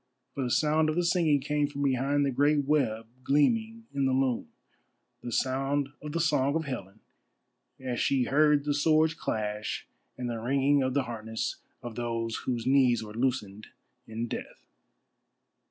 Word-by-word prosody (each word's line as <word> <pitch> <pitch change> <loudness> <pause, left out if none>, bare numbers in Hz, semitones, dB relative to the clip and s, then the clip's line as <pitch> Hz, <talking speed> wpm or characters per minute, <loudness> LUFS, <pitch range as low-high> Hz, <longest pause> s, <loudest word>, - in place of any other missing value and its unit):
For 140 - -4
the 125 - -1
sound 155 +4 +2
of 155 - -1
the 175 0 +1
singing 170 -5 +3
came 150 +1 0
from 140 0 -4
behind 140 +2 +1
the 140 - 0
great 145 +2 +2
web 125 -7 +1 0.2
gleaming 225 - +1
in 140 -1 0
the 130 - +1
loom, 130 -2 0 0.7
the 120 - -6
sound 135 +3 0
of 150 -1 -6
the 170 - 0
song 145 -3 +2
of 160 -1 -1
Helen 110 -6 -6 0.8
as 125 -2 -3
she 135 -2 +2
heard 145 +2 +3
the 145 - +1
swords 155 +2 +3
clash 105 -7 -3 0.3
and 125 - -3
the 115 -1 -3
ringing 135 +4 +2
of 130 0 -1
the 140 - +2
harness 110 -2 -4 0.3
of 120 -1 -6
those 115 -1 -2
whose 120 -3 -1
knees 130 -4 +4
were 105 -1 -9
loosened 110 -4 -2 0.4
in 115 +1 -4
death. - - -7
135 Hz, 165 wpm, -29 LUFS, 120-150 Hz, 0.8 s, knees